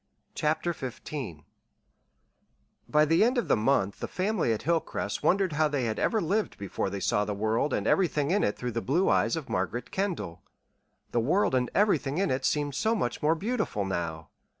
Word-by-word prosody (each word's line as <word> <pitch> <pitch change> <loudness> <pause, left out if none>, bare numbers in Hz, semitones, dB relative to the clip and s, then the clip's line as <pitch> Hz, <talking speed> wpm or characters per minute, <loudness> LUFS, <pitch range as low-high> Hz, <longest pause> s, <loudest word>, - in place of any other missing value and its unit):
CHAPTER 155 +3 0
XV 125 - -6 1.5
By 150 0 +4
the 165 +6 +4
end 250 +3 +2
of 240 - 0
the - - +4
month 105 -3 +1
the - - -3
family 190 - 0
at 110 - -2
Hilcrest 165 +1 -1
wondered 190 -2 +2
how 155 +1 +3
they 145 -3 -1
had 110 -2 -1
ever 220 - +2
lived 205 +4 -1
before 100 0 -3
they 100 +1 -4
saw 105 - +1
the 105 0 -3
world 110 +7 0
and - - -1
everything 155 -5 +2
in 205 - +2
it 105 - 0
through 125 0 -3
the 115 0 -2
blue 170 +11 +1
eyes - - +2
of 160 -4 -5
Margaret 105 +7 -2
Kendall 180 - -3 0.7
the 120 - +1
world 155 - +2
and 125 -1 +1
everything 170 -8 +2
in 195 +1 +1
it 130 +1 -1
seemed 145 -1 0
so 220 - +1
much 120 - -2
more 155 +2 +3
beautiful 205 - -2
now! 85 -4 -4
145 Hz, 190 wpm, -28 LUFS, 110-185 Hz, 1.5 s, By